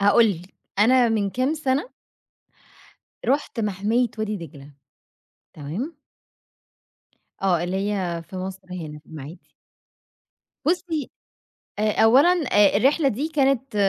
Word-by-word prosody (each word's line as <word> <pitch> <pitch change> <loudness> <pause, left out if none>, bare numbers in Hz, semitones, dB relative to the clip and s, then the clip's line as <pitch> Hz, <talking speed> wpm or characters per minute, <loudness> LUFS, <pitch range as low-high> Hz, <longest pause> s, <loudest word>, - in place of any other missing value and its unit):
هأقول 205 +3 +5
لِك. 180 0 -8 0.2
أنا 245 +3 +5
من 210 -3 0
كام 255 +7 0
سنة 290 - -1 1.4
رُحت 265 -3 0
مَحمية 210 +4 0
وادي 215 -1 -2
دجلة. 145 -5 -11 0.8
تمام؟ 195 - -5 1.5
آه. 180 -3 +2
اللي 180 +2 -2 0.2
هي 175 -4 -2
في 185 - -10
مصر 190 0 -6
هنا 155 -4 -6
في 150 - -24
المَعَادي. 155 +2 -11 1.1
بُصّي، 325 -3 -1 0.7
أ 215 +1 +2
أولًا 260 +9 +6 0.2
أ 205 -1 +5
الرحلة 275 +7 +3
دي 270 +6 -2
كانت 270 -5 +1
210 Hz, 110 wpm, -23 LUFS, 185-265 Hz, 1.5 s, أولًا